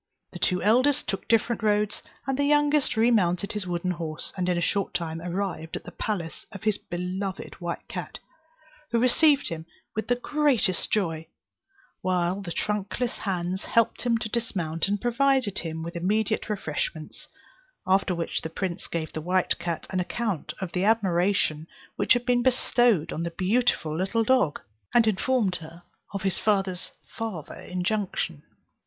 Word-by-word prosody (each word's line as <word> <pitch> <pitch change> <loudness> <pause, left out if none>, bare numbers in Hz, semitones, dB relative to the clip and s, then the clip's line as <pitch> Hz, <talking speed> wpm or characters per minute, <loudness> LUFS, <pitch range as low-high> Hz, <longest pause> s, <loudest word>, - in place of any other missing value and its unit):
The - - -8
two 180 -1 +1
eldest 255 +7 +3
took 195 -1 -3
different 230 +1 +2
roads, 210 -1 +2 0.2
and 270 0 0
the 285 - +1
youngest 295 -3 +3
remounted 200 -5 +3
his 210 -3 -3
wooden 175 +1 -1
horse, 165 -3 -3
and 180 -1 -1
in 180 - +2
a - - +2
short 195 +2 0
time 165 -2 -2
arrived 180 -2 -3
at - - -5
the - - -9
palace 175 -7 -3
of 200 0 -9
his 215 -2 +1
beloved 185 +2 -4
white 170 0 -4
cat, - - -5 0.7
who 235 - +1
received 275 +4 +4
him 165 -1 -6 0.3
with 220 - -2
the 245 - +3
greatest 250 - +1
joy, 165 -6 0 0.7
while 180 +1 +1
the 180 -3 -6
trunkless 210 +6 -1
hands 185 -1 -2
helped 230 -1 +2
him 240 -2 +2
to 225 - -3
dismount, 195 -8 -1
and 205 +1 0
provided 250 -3 +2
him 160 -1 -4
with 170 +2 -6
immediate 215 +6 0
refreshments; 155 -5 -3 0.6
after 190 -1 +3
which 170 -1 -2
the 160 - -4
prince 175 +1 -3
gave 160 -2 -3
the 155 - -3
white 180 +3 +1
cat 170 -2 -3
an 185 - 0
account 185 -4 -2
of 190 -3 -4
the 180 +2 0
admiration 185 -6 +2 0.3
which - - +4
had 245 -1 0
been 245 -1 +3
bestowed 240 -7 +3
on 160 - -3
the 170 - -1
beautiful 185 -3 +1
little 195 +7 +1
dog, 255 - +3 0.4
and 235 -1 +7
informed 215 -2 +1
her 165 +2 -12 0.3
of 200 -1 -4
his 190 -2 0
father's 195 -4 +1 0.2
farther 215 -9 -4
injunction. 180 -4 -2
195 Hz, 160 wpm, -26 LUFS, 175-225 Hz, 0.7 s, and